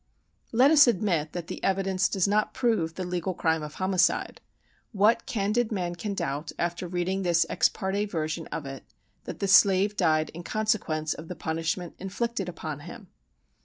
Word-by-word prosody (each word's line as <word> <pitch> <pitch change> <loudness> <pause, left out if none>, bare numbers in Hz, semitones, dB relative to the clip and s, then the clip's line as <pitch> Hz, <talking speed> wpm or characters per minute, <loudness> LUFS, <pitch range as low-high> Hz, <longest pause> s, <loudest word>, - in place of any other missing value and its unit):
Let 255 +5 +5
us 295 -4 +7
admit 175 -8 0
that 175 -2 -4
the - - -7
evidence 195 0 +1
does 190 -1 +1
not 210 +1 +1
prove 225 -11 0
the 185 - -4
legal 180 0 -3
crime 160 -2 +1
of 150 0 -7
homicide: 185 -1 +1 0.5
what 220 +3 +3
candid 225 0 0
man 180 -4 -2
can 200 +4 -4
doubt, 145 -1 -3
after 175 +1 -2
reading 180 +2 -1
this 170 -2 +2
ex - - +3
parte 200 +1 -2
version 160 -4 -3
of 160 -2 -5
it, 135 -1 -7 0.4
that - - -6
the 200 - -2
slave 195 +1 +5
died 155 -4 +2
in 170 - -8
consequence 180 -7 -1
of 160 - -10
the 180 - -6
punishment 165 +2 -3
inflicted 200 +1 -3
upon 155 -4 -6
him? 145 - -11
185 Hz, 170 wpm, -27 LUFS, 165-205 Hz, 0.5 s, us